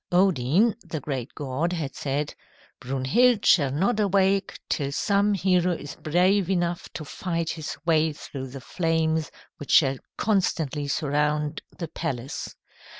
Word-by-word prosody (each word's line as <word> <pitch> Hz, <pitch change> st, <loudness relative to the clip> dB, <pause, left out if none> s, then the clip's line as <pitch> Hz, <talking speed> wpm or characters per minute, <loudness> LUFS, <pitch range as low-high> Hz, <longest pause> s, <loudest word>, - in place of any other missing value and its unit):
Odin, 185 Hz, -, +3 dB
the 165 Hz, -4 st, -5 dB
great 130 Hz, -3 st, -5 dB
god, 145 Hz, +5 st, -2 dB
had 155 Hz, -6 st, -3 dB
said, 145 Hz, +1 st, -2 dB, 0.5 s
"Brunhild 140 Hz, -, +2 dB
shall 145 Hz, -7 st, +5 dB
not 195 Hz, -, +1 dB
awake 195 Hz, -1 st, +2 dB
till 140 Hz, -2 st, -1 dB
some 200 Hz, +6 st, +2 dB
hero 180 Hz, -2 st, +2 dB
is 145 Hz, -4 st, -6 dB
brave 180 Hz, +4 st, +2 dB
enough 175 Hz, -2 st, -1 dB
to 155 Hz, -, -6 dB
fight 170 Hz, +1 st, -2 dB
his 155 Hz, -2 st, -5 dB
way 160 Hz, -1 st, +3 dB
through 135 Hz, -2 st, -7 dB
the 130 Hz, +1 st, -9 dB
flames 160 Hz, 0 st, 0 dB, 0.3 s
which 145 Hz, -, -9 dB
shall 135 Hz, -3 st, +5 dB, 0.2 s
constantly 160 Hz, -8 st, 0 dB
surround 150 Hz, +1 st, 0 dB, 0.2 s
the 170 Hz, -, -4 dB
palace. 140 Hz, -4 st, -4 dB
160 Hz, 135 wpm, -25 LUFS, 145-185 Hz, 0.5 s, shall